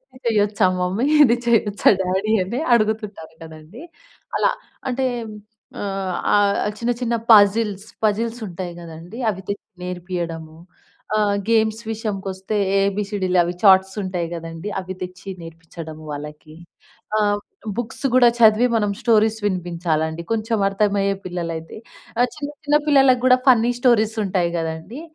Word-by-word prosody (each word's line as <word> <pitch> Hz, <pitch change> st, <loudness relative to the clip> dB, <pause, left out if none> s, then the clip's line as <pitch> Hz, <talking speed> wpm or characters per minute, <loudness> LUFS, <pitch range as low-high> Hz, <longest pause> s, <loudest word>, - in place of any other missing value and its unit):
ఇది 255 Hz, -, -16 dB
చెయ్యొచ్చా 210 Hz, -2 st, +2 dB
మమ్మీ? 185 Hz, +7 st, 0 dB, 0.2 s
ఇది 240 Hz, -4 st, +4 dB
చెయ్యొచ్చా 215 Hz, -3 st, +3 dB
డ్యాడీ? 190 Hz, +3 st, -1 dB
అని 220 Hz, +7 st, -4 dB, 0.2 s
అడుగుతుంటారు 215 Hz, -6 st, -2 dB
గదండీ, 160 Hz, -, -12 dB, 0.6 s
అలా. -, -, +2 dB, 0.4 s
అంటే, 260 Hz, +1 st, -1 dB, 0.8 s
ఆహ్, 195 Hz, -2 st, -3 dB, 0.2 s
ఆహ్, 205 Hz, 0 st, +2 dB
చిన్న, 240 Hz, +1 st, 0 dB
చిన్న 235 Hz, -1 st, 0 dB, 0.2 s
పజిల్స్ 205 Hz, 0 st, +4 dB, 0.2 s
పజిల్సుంటాయి 210 Hz, -5 st, -2 dB
గదండీ 170 Hz, +6 st, -10 dB
అవి 190 Hz, -3 st, -4 dB
తెచ్చి 200 Hz, 0 st, -5 dB
నేర్పియడము. 170 Hz, -3 st, -5 dB, 0.6 s
ఆహ్, 205 Hz, -1 st, +2 dB
గేమ్స్ 220 Hz, 0 st, +2 dB
విషయంకొస్తే, 195 Hz, -2 st, -4 dB, 0.3 s
ఏబీసీడీలు 195 Hz, -2 st, 0 dB
అవి 175 Hz, +1 st, -3 dB
చార్ట్సుంటాయి 190 Hz, -2 st, +3 dB
గదండీ, 165 Hz, +3 st, -7 dB
అవి 185 Hz, +1 st, -7 dB
తెచ్చి 180 Hz, +1 st, -7 dB
నేర్పించ్చడము 165 Hz, -1 st, -10 dB
వాళ్ళకి. 150 Hz, +1 st, -8 dB, 0.6 s
ఆహ్, 205 Hz, -1 st, +1 dB, 0.4 s
బుక్స్ 240 Hz, +4 st, -5 dB
గూడా 250 Hz, -1 st, +6 dB
చదివి, 225 Hz, +2 st, +6 dB
మనం 210 Hz, -2 st, 0 dB
స్టోరీస్ 220 Hz, -2 st, +3 dB
వినిపించాలండి, 170 Hz, -3 st, -2 dB
కొంచమర్థమయ్యే 200 Hz, -2 st, +1 dB
పిల్లలైతే. 170 Hz, -2 st, -5 dB, 0.4 s
ఆహ్, 245 Hz, +1 st, +3 dB
చిన్న, 290 Hz, -2 st, -5 dB, 0.2 s
చిన్న 295 Hz, 0 st, +4 dB
పిల్లలకు 270 Hz, -4 st, +5 dB
గూడా 255 Hz, 0 st, +6 dB
ఫన్నీ 240 Hz, -2 st, +5 dB
స్టోరీసుంటాయి 215 Hz, -7 st, +2 dB
గదండీ, 160 Hz, -, -5 dB
200 Hz, 115 wpm, -21 LUFS, 175-220 Hz, 0.8 s, గూడా